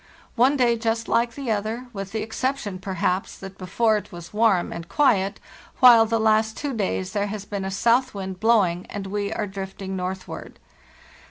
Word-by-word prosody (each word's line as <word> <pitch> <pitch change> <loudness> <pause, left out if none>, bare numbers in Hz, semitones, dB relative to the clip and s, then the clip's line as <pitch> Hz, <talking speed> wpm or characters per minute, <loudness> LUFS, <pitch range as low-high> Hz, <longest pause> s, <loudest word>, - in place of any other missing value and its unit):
One 260 +4 +4
day 240 -2 +3
just 225 0 -1
like 235 0 +1
the 275 -5 -3
other, 220 +4 -2
with 195 -1 -6
the 220 0 -2
exception, 225 -3 -3
perhaps, 185 0 -2
that 195 0 -10
before 215 +4 +1
it 210 - -8
was 175 0 -10
warm 210 -5 +2
and 170 0 -8
quiet, 200 -9 +2 0.4
while 235 -3 +8
the 230 0 +1
last 220 0 +2
two 290 -2 -3
days 190 -4 -2
there 205 -1 0
has 205 -1 -6
been 200 -2 -4
a - - -2
south 235 +6 +2
wind 190 -2 -5
blowing, 195 -6 +2
and 205 -1 -5
we 200 +1 -2
are 220 - -2
drifting 195 0 -6
northward. 185 0 -6
210 Hz, 180 wpm, -24 LUFS, 190-230 Hz, 0.4 s, while